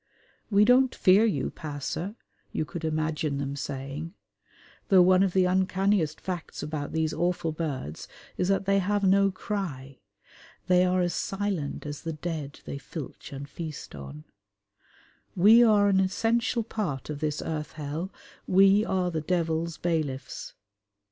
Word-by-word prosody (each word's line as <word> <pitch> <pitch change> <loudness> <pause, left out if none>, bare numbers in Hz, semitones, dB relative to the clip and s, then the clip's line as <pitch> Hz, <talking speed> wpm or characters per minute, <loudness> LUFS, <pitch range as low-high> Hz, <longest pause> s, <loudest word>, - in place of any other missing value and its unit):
"We 205 0 +5
don't 255 +2 +4
fear 195 +4 +5
you, 220 - 0
passer," 155 +6 -5 0.4
you 155 - -1
could 165 +2 -7
imagine 155 -2 -1
them 140 0 -3
saying 140 +5 -5 0.7
(though 185 -2 +7
one 185 +1 +5
of 195 -2 +2
the 185 -1 +4
uncanniest 190 -3 +1
facts 180 -4 -5
about 150 -2 -4
these 160 -1 0
awful 175 -2 0
birds 140 - -4 0.3
is 180 - 0
that 195 0 +1
they 195 0 +3
have 200 +2 0
no 195 +1 +5
cry: 175 - -5 0.7
they 180 0 +4
are 180 0 +2
as 175 -1 0
silent 195 -9 -2
as 145 0 -5
the 165 - -4
dead 155 -2 -5
they 140 - -5
filch 145 0 -8
and 140 0 -7
feast 155 0 -7
on), 70 +1 -9 1.1
"we 215 +6 +7
are 210 -3 +5
an 195 -1 +4
essential 225 +5 +1
part 175 - -4
of 145 - -5
this 150 -1 -1
earth 150 -2 -4
hell: 155 +5 -4 0.4
we 195 +2 +5
are 185 -4 0
the 160 -2 -2
Devil's 165 0 -1
bailiffs." 145 -6 -3
170 Hz, 150 wpm, -27 LUFS, 150-195 Hz, 1.1 s, though